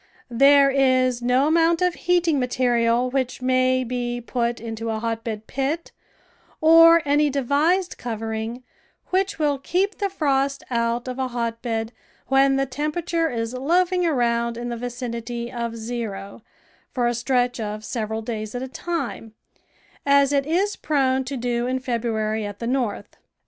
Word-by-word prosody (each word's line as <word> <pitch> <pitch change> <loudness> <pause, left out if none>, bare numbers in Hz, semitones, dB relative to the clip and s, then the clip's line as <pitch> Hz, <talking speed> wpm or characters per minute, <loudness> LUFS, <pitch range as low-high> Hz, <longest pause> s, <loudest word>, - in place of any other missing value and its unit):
There 275 +3 +6
is 255 -2 +2
no 250 +3 +2
amount 330 +1 +3
of 360 -1 +2
heating 345 -4 +1
material 245 -1 +1
which 260 -1 -1
may 255 0 +2
be 245 0 -3
put 235 0 -2
into 225 0 -5
a 220 - -1
hotbed 225 -1 -4
pit, 280 +7 -3 0.7
or 330 +1 +7
any 290 +1 +3
devised 290 +7 +1
covering 225 +1 -4 0.5
which 385 +2 0
will 295 -3 0
keep 370 +8 -1
the 400 -1 0
frost 275 -6 0
out 235 +1 0
of 255 +1 -5
a 260 - 0
hotbed 230 -1 -3 0.4
when 270 0 +4
the 270 0 +1
tempera 300 +6 -3
ture 330 -1 0
is 230 -2 -3
loafing 355 +7 +1
around 235 -6 +1
in 240 0 -4
the 240 - -3
vicinity 240 -1 -5
of 235 -2 -4
zero 220 -3 -5 0.5
for 245 -2 -1
a 240 - +2
stretch 245 0 0
of 215 0 -5
several 220 -2 -3
days 215 -1 -5
at 245 - -3
a - - -4
time, 265 -7 -5 0.7
as 280 0 +4
it 280 0 +1
is 380 +6 +1
prone 265 -3 +1
to 270 +1 -4
do 240 0 -1
in 260 +1 0
February 225 -4 -2
at 205 -1 -6
the 230 - -5
North. 245 -3 -2
250 Hz, 155 wpm, -23 LUFS, 235-280 Hz, 0.7 s, or